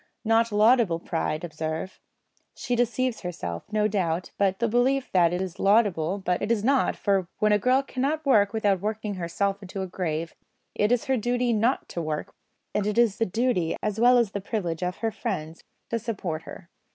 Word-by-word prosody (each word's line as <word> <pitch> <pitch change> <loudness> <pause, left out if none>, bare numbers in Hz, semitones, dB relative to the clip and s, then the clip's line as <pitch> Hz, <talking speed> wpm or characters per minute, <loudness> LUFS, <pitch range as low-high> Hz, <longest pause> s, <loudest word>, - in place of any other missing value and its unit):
Not 225 +1 +3
laudable 215 -3 +4
pride, 165 -2 -3
observe. 160 +2 -4 0.6
She 245 - -2
deceives 245 0 0
herself, 90 - -6
no 215 0 +2
doubt, 180 -4 -1
into 195 -1 +2
the 235 - +1
belief 250 +4 +1
that 175 -3 +4
it 180 +1 -1
is 185 -2 -7
laudable, 195 -4 +2
but 180 -2 -1
it 215 - -1
is 215 -3 +1
not; 270 +2 +2
for, 195 -3 0
when 215 0 +2
a 210 - +4
girl 255 +5 +3
cannot 285 +4 -2
work 205 -7 +4
without 205 -4 +1
working 215 0 -3
herself 195 +3 -2
into 195 0 -7
her 190 - -2
grave, 165 -3 -3 0.4
it 210 +2 +1
is 245 -2 +2
her 265 -1 +1
duty 245 +1 0
not 230 +5 +1
to 170 - -4
work, 155 +4 -4 0.4
and 210 -1 0
it 210 - -1
is 230 -4 +3
the 225 - +2
duty 220 -5 0
as 210 0 -1
well 245 +2 +6
as 235 -5 +2
the 200 - -4
privilege 185 -6 -3
of 180 0 -2
her 225 - +1
friends 160 -4 -5 0.3
to 230 - 0
support 200 -8 -4
her. 170 - -11
205 Hz, 195 wpm, -26 LUFS, 180-230 Hz, 0.6 s, well